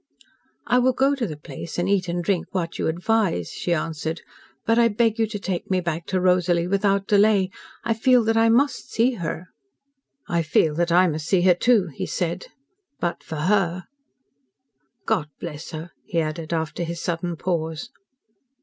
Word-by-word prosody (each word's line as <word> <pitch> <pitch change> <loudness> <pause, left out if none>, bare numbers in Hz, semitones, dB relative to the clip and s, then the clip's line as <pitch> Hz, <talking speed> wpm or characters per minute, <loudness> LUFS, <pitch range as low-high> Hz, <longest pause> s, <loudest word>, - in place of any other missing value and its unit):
"I 250 - +3
will 255 +1 +3
go 270 +3 +3
to 260 -5 -2
the 155 - -6
place, 155 +2 -8
and 175 +1 0
eat 195 -2 +1
and 175 0 -2
drink 180 -1 0
what 170 -3 -3
you - - 0
advise," 175 - 0
she 175 - -3
answered. 160 0 -2 0.4
"But 225 +1 +3
I 235 - +6
beg 225 +1 +1
you 225 - +3
to 210 0 -5
take 190 -3 -4
me 185 -1 +2
back 170 -1 -3
to 190 - 0
Rosalie 180 -1 +2
without 195 +1 +1
delay. 200 -2 +3 0.3
I 230 - +1
feel 245 +2 +4
that 225 +1 +1
I 225 0 +4
must 275 +5 +2
see 235 +3 +2
her." 165 +1 -4 0.8
"I 170 -1 +1
feel 155 -1 +2
that 170 +2 0
I 180 +2 +6
must 155 -1 -3
see 190 -3 +3
her, 180 0 +6
too," 200 0 +3
he - - -4
said. 175 +1 -2 0.5
"But 175 -1 -2
for 155 -2 -5
her 185 -3 +1 1.2
God 190 -9 +1
bless 150 -3 -7
her!" 160 +2 -7
he 170 - -1
added, 155 0 -3
after 160 0 -2
his 170 0 -4
sudden 175 0 -2
pause. 160 - -3
180 Hz, 180 wpm, -23 LUFS, 165-210 Hz, 1.2 s, I